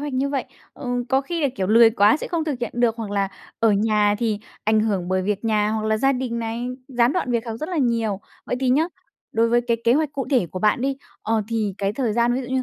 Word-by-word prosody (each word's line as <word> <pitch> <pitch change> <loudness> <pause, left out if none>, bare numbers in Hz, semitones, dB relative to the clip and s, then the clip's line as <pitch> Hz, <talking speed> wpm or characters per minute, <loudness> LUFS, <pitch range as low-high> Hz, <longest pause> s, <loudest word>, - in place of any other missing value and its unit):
hoạch 290 -1 -4
như 265 +2 0
vậy, 275 -2 -1 0.3
ừm, 245 -2 -3
có 265 0 +3
khi 330 +3 -3
là, 280 - +3
kiểu, 190 - -1
lười 225 +2 +7
quá 210 +2 +4
sẽ - - -6
không 335 -3 -1
thực 295 -5 -2
hiện 240 - -3
được, 240 -1 +2
hoặc 220 -3 -5
là 200 -1 0 0.3
ở 225 -1 +4
nhà 210 0 +2
thì 220 -3 0 0.3
ảnh 215 0 +3
hưởng 195 -5 -1
bởi 185 0 +1
việc 205 +2 -2
nhà, 215 -1 +2
hoặc 215 0 -2
là 220 0 +2
gia 270 +4 +3
đình 250 -2 -2
này, 230 +1 -3 0.2
gián 245 0 +2
đoạn 345 -9 -1
việc 235 0 0
học 225 -1 -4
rất 310 - -3
là 355 - -3
nhiều. 230 -6 0 0.3
Vậy 250 - -1
thì 260 - +1
nhá, 300 +5 +4 0.5
đối 230 +1 +2
với 240 +1 +3
cái 235 -1 0
kế 235 - +5
hoạch 300 0 0
cụ 275 -2 -3
thể 245 -10 +3
của 185 - -6
bạn 210 +4 +2
đi, 270 +1 0 0.3
ờ, 220 -1 +1
thì 215 -4 -1
cái 200 0 0
thời 235 -3 -1
gian 235 +1 +2
ví 260 - -1
dụ 245 - -8
như 260 0 0
230 Hz, 275 wpm, -22 LUFS, 215-260 Hz, 0.5 s, lười